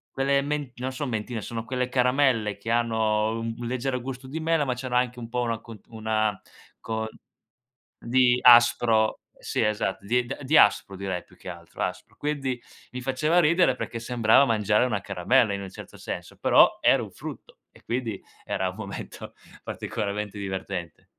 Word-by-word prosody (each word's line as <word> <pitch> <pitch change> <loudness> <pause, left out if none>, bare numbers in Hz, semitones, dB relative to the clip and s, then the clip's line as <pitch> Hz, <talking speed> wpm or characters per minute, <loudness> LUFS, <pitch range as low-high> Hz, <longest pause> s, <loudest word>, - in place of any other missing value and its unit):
quelle 140 +1 +2
men 145 -2 -3
non 130 +2 -4
son 135 +1 -3
mentine, 110 0 -3
sono 115 +1 -5
quelle 125 +1 -2
caramelle, 125 -4 +2
che 110 +3 -5
hanno 110 -2 +1
u 115 - -3 0.2
un 120 - -5
leggero 125 +1 -2
gusto 130 +1 -7
di 155 +4 -4
mela, 165 -1 +1
ma 130 -3 0
c'hanno 125 0 -4
anche 125 0 +1
un 115 - -6
po' 125 +2 -2
una 115 -2 -1
co 115 -1 -11
una 110 -2 -1 0.4
con 110 -1 -3 0.9
di 125 0 +3
aspro, 120 -2 +5 0.2
sì - - -3
esatto, 105 -2 -1
di 120 +3 +1 0.2
di 145 +4 +2
aspro 100 -3 +4
direi 95 -2 -3
più - - -21
che 90 - -8
altro, 85 -1 -8
aspro. - - -5
Quindi, 140 -4 -2 0.3
mi 125 - -5
faceva 150 +6 +1
ridere 170 -4 +4
perché, 115 - -5
sembrava 120 +2 +4
mangiare 105 -1 +2
una 105 -5 -1
caramella, 100 +5 +2
in 100 - -3
un 95 - -7
certo - - -11
senso, - - -6
però - - +5
era - - +4
un - - -7
frutto, - - -10
e - - -21
quindi 115 -4 -3 0.2
era 95 -1 -1
un 90 - -12
momento 100 -2 -8 0.3
particolarmente 105 0 -4
divertente. 95 -4 -5
120 Hz, 175 wpm, -26 LUFS, 105-130 Hz, 0.9 s, aspro